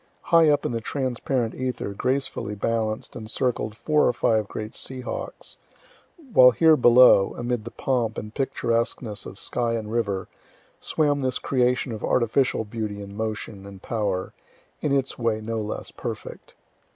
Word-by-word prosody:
High 165 -2 +7
up 145 - +2
in - - 0
the 115 -1 -2
transparent 125 -1 -1
ether 125 -5 -3
gracefully 130 -3 -2
balanced 110 +1 -2
and 110 -1 -7
circled 115 -3 -1
four 150 +2 +2
or - - +2
five 110 -3 +1
great 110 +1 -6
sea 130 -1 -2
hawks, 125 - -6 0.8
while 125 -5 +9
here 155 +6 +5
below, 120 -6 +6
amid 120 -2 -2
the - - -5
pomp 120 -5 -1
and 105 +1 -6
picturesqueness 115 -4 -1
of 95 - -10
sky 120 +1 -1
and 110 -2 -4
river, 100 -5 -1 0.5
swam 145 -2 +1
this 130 -1 0
creation 125 -1 +1
of 110 - -6
artificial 120 -1 +1
beauty 105 -1 -4
and 100 0 -9
motion 110 -2 -4
and 100 -1 -12
power, 100 -5 -2 0.5
in 150 - -1
its 135 -2 0
way 115 -2 0
no 110 +1 -3
less 105 0 -5
perfect. - - -7
115 Hz, 155 wpm, -25 LUFS, 110-130 Hz, 0.8 s, while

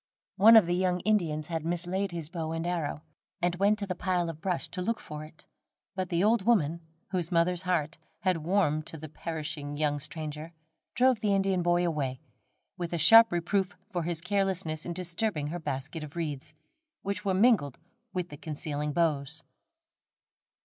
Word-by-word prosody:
One 225 +3 +8
of 220 -5 +8
the 175 - 0
young 180 0 +1
Indians 165 -8 +1
had 165 -2 -2
mislaid 175 +4 -1
his 165 -3 -5
bow 165 -1 -4
and 165 +1 -3
arrow, 165 -4 -2 0.4
and 175 -1 +1
went 200 +3 +3
to 205 - -3
the 190 - -2
pile 175 -2 0
of 160 0 -15
brush 185 -3 -1
to 185 - -4
look 230 +5 -1
for 150 0 -8
it; 155 0 -15 0.5
but 185 -1 -3
the 170 +2 +1
old 220 +1 +4
woman, 170 -7 +2 0.3
whose 180 -3 -1
mother's 175 +1 +2
heart 170 -3 -1 0.2
had 185 -3 +2
warmed 155 -2 +1
to 160 - -5
the 155 +1 -8
perishing 155 -2 -5
young 145 -1 +1
stranger, 155 +2 -5 0.4
drove 255 -2 +4
the 210 -2 +2
Indian 195 -2 +1
boy 175 0 +2
away, 140 -6 -2 0.6
with 175 -1 -3
a - - +1
sharp 225 +8 +8
reproof 185 +3 0 0.2
for 175 -3 -1
his 165 -1 -2
carelessness 185 -4 -1
in 170 - -3
disturbing 170 -3 -1
her 175 +3 -4
basket 145 +1 -4
of 150 +1 -10
reeds, 155 -2 -4 0.5
which 200 +1 -3
were 195 -2 +1
mingled 195 - +3 0.3
with 180 -2 -3
the 145 - -9
concealing 150 -1 -4
boughs. 160 -1 0
170 Hz, 175 wpm, -29 LUFS, 155-190 Hz, 0.6 s, One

